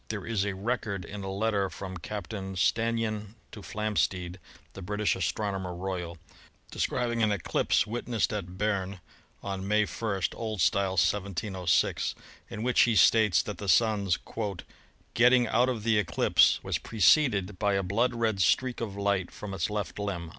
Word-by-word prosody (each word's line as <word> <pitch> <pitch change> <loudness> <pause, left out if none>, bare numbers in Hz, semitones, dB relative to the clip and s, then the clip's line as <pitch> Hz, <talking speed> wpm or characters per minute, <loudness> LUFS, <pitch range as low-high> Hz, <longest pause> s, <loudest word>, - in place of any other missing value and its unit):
There 110 -3 -5
is 105 -4 0
a 100 -1 -2
record 100 -2 -3
in 100 -1 -7
a 95 - -4
letter 100 0 0
from 95 -1 -7
Captain 95 +1 -6
Stannyan 110 +2 0 0.2
to 105 - -10
Flamsteed, 95 -4 -2 0.4
the 95 - -9
British 105 +3 0
Astronomer 95 -1 -2
Royal, 90 -2 -4 0.5
describing 120 -2 -1
an 110 -1 +3
eclipse 100 0 +1
wit 115 +3 -5
nessed 115 -3 0
at 90 -3 -6
Berne 100 -2 -1 0.4
on 95 -1 -4
May 105 +1 +3
1 100 -4 -3
(O. 110 -1 -4
S.), 85 -5 +3
1706, 95 0 0 0.3
in 110 - -5
which 125 0 +3
he 115 -2 +3
states 100 -3 +5
that 105 -4 -6
the 100 - -4
Sun's 100 -4 +3 1.0
"getting 125 +1 +5
out 120 +3 +2
of 115 -5 -3
the 110 -1 +3
eclipse 85 -5 +3
was - - -1
preceded 105 - +2
by 100 -2 +2
a 95 - 0
blood 115 +7 0
red 110 -4 0
streak 125 +6 +2
of 105 -4 -4
light 100 -3 0
from 105 -2 -8
its 95 - -1
left 105 0 -4
limb." 90 -5 -4
100 Hz, 160 wpm, -28 LUFS, 95-110 Hz, 1.0 s, states